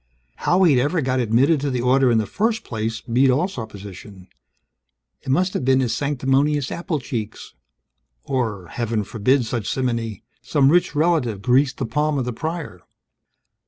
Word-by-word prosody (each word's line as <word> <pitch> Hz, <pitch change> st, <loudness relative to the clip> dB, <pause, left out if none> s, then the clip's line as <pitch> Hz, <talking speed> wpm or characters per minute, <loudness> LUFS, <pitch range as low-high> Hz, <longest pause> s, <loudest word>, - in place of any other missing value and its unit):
How 185 Hz, +2 st, +2 dB
he'd 140 Hz, -8 st, +5 dB
ever 150 Hz, +6 st, 0 dB
got 130 Hz, -1 st, 0 dB
admitted 125 Hz, +6 st, +2 dB
to 145 Hz, -, -1 dB
the 125 Hz, -2 st, -1 dB
order 130 Hz, +1 st, +3 dB
in 115 Hz, -, +3 dB
the 110 Hz, -, +1 dB
first 225 Hz, -, -1 dB
place 110 Hz, -1 st, -4 dB
beat 125 Hz, +3 st, +2 dB
all 145 Hz, +8 st, +2 dB
supposition. 100 Hz, -, -10 dB, 0.9 s
It -, -, -9 dB
must 180 Hz, +7 st, +1 dB
have -, -, -2 dB
been 130 Hz, +1 st, +3 dB
his 125 Hz, -3 st, 0 dB
sanctimonious 140 Hz, 0 st, 0 dB
apple 170 Hz, -3 st, -3 dB
cheeks 115 Hz, -4 st, -6 dB, 0.7 s
or 110 Hz, -8 st, -2 dB
(Heaven 115 Hz, -2 st, -2 dB
forbid 120 Hz, +5 st, +1 dB
such 115 Hz, -3 st, -3 dB
simony), 115 Hz, -5 st, -2 dB, 0.2 s
some 140 Hz, -2 st, +2 dB
rich 175 Hz, -2 st, +2 dB
relative 145 Hz, -, +1 dB
greased 130 Hz, +2 st, +2 dB
the 135 Hz, -, -2 dB
palm 150 Hz, +6 st, 0 dB
of 130 Hz, -, -1 dB
the 125 Hz, -, -3 dB
Prior. 160 Hz, -, -5 dB
130 Hz, 160 wpm, -22 LUFS, 115-145 Hz, 0.9 s, he'd